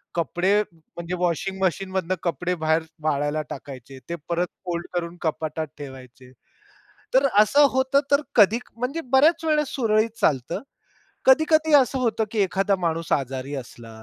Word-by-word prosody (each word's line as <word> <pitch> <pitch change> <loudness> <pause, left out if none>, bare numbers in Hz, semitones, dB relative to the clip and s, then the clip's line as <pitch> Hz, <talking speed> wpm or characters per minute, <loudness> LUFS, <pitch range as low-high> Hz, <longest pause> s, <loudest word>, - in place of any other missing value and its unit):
कपडे 175 +5 +1
म्हणजे 170 +2 -7
वॉशिंग 180 +2 -1
मशीनमधून 185 -1 -1
कपडे 180 +1 -1
बाहेर 160 0 +1 0.2
वाळायला 145 0 0
टाकायचे. 135 -1 -9
ते 170 - -2
परत 175 +1 0 0.2
फोल्ड 175 -1 -3
करून 175 0 -3
कपाटात 155 -1 -2
ठेवायचे. 130 -3 -11 0.8
तर 270 +2 +5
असं 285 +8 +6
होतं. 260 +2 +2
तर 280 +1 +5
कधी 215 +1 +5 0.2
म्हणजे 255 +8 -3
बऱ्याच 300 +6 +4
वेळेस 300 -2 +2
सुरळीत 220 -3 +2
चालतं. 140 -4 0 0.6
कधी-कधी 315 +3 +4
असं 270 -1 +4
होतं, 225 -3 0
की 225 - -4
एखादा 195 +1 +1
माणूस 165 -2 -2
आजारी 135 0 -2
असला 115 -4 -9
180 Hz, 135 wpm, -24 LUFS, 155-230 Hz, 0.8 s, असं